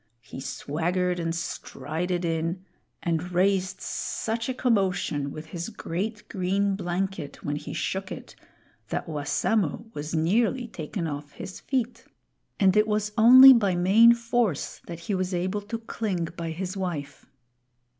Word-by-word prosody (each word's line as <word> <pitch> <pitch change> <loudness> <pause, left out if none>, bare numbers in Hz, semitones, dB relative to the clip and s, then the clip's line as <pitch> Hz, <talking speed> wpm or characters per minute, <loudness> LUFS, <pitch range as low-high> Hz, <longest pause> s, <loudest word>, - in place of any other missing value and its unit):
He - - -9
swaggered 175 +6 -1
and 165 0 -1
strided 175 0 -3
in, 165 +3 -2 0.4
and 170 +1 -1
raised 190 +1 +1
such 230 +2 -3
a - - 0
commotion 190 - +1
with 155 +3 -8
his 170 +3 -4
great 210 +1 -4
green 195 +1 0
blanket 185 -4 -3
when 145 - -1
he 150 0 -6
shook 190 0 -3
it, - - -8 0.5
that - - -2
Wassamo 160 +6 0
was 150 +3 -4
nearly 225 +10 +1
taken 170 -1 -5
off 145 -1 -5
his 190 0 -8
feet; 250 -3 -2 0.5
and 190 -2 +4
it 210 0 +4
was 210 -1 0
only 255 +4 +10
by 200 -7 +2
main 215 +7 +6
force 235 - -1
that 170 -1 -7
he 200 - -3
was 185 -1 -1
able 185 +4 -1
to 210 +3 -5
cling 205 -7 -3
by 170 -1 -4
his 180 +4 -4
wife. 170 -7 -5
185 Hz, 145 wpm, -26 LUFS, 165-210 Hz, 0.5 s, only